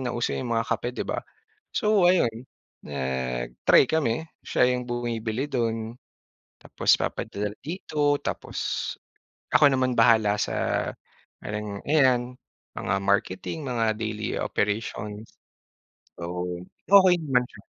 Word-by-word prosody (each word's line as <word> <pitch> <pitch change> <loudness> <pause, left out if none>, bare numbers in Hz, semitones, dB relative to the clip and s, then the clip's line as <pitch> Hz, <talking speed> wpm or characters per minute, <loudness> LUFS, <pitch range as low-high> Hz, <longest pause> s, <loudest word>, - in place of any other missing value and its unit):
nauso 120 -2 -1
yung 125 - -3
mga 115 - +1
kape 120 +2 -3
‘di - - -2
ba. - - -2 0.5
So 210 -3 +2
ayun, 125 -10 +3 0.4
nag-try 65 - +1
kami. 160 -1 0 0.2
Siya 125 - +3
yung 125 - -3
bumibili 120 +1 -2
dun, 115 -3 -2 0.7
tapos - - +2
papadala 105 +1 -2 0.2
dito, 150 -4 0
tapos - - -3 0.5
ako 145 -2 +5
naman 130 -1 +1
bahala 110 -3 +5
sa 105 - -1 0.5
parang, 105 -1 -5
ayan 125 -4 +3 0.4
mga 95 - -1
marketing, 100 - 0
mga 115 -3 +1
daily 110 0 -3
operation. 105 0 -2 1.0
Oo. 90 +1 -4 0.2
Okey 190 -2 +7
naman 125 -3 +1
siya. - - -16
115 Hz, 110 wpm, -26 LUFS, 105-130 Hz, 1.0 s, Okey